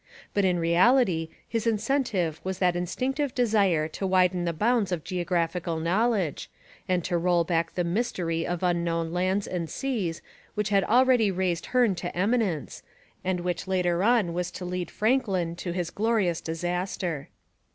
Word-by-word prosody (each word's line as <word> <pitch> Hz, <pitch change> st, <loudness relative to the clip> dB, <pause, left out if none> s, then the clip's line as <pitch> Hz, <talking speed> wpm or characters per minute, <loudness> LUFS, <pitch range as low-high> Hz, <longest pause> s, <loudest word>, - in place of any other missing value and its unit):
But 200 Hz, -1 st, +2 dB
in 180 Hz, -1 st, +2 dB
reality, 170 Hz, 0 st, +3 dB, 0.2 s
his 230 Hz, 0 st, -2 dB
incentive 215 Hz, -, 0 dB
was 190 Hz, -1 st, -3 dB
that 180 Hz, -2 st, +2 dB
instinctive 255 Hz, -, -2 dB
desire 200 Hz, -10 st, +2 dB
to 195 Hz, +4 st, -3 dB
widen 180 Hz, -1 st, +2 dB
the 170 Hz, -, +1 dB
bounds 215 Hz, +3 st, +1 dB
of 170 Hz, -4 st, -2 dB
geographical 175 Hz, -2 st, -1 dB
knowledge, 190 Hz, -, 0 dB, 0.4 s
and 180 Hz, -2 st, +1 dB
to 175 Hz, +1 st, 0 dB
roll 175 Hz, 0 st, +2 dB
back 165 Hz, -1 st, -1 dB
the 180 Hz, -, +1 dB
mystery 170 Hz, -3 st, -1 dB
of 175 Hz, +1 st, -3 dB
unknown 170 Hz, -2 st, 0 dB
lands 185 Hz, +3 st, 0 dB
and 170 Hz, -3 st, -3 dB
seas 215 Hz, -12 st, -3 dB, 0.3 s
which 210 Hz, -1 st, -1 dB
had 200 Hz, -2 st, +3 dB
already 245 Hz, -2 st, +4 dB
raised 185 Hz, -2 st, -1 dB
Hearne 245 Hz, -5 st, +3 dB
to 175 Hz, 0 st, -5 dB
eminence, 200 Hz, -, 0 dB, 0.4 s
and 185 Hz, -1 st, -1 dB
which 180 Hz, +1 st, -3 dB
later 180 Hz, -2 st, +1 dB
on 220 Hz, -6 st, +3 dB
was 175 Hz, 0 st, -2 dB
to 180 Hz, -, -6 dB
lead 180 Hz, 0 st, -3 dB
Franklin 205 Hz, -8 st, 0 dB
to 175 Hz, 0 st, -4 dB
his 175 Hz, -1 st, -3 dB
glorious 210 Hz, -6 st, +1 dB
disaster. 175 Hz, -2 st, -3 dB
180 Hz, 155 wpm, -27 LUFS, 170-210 Hz, 0.4 s, already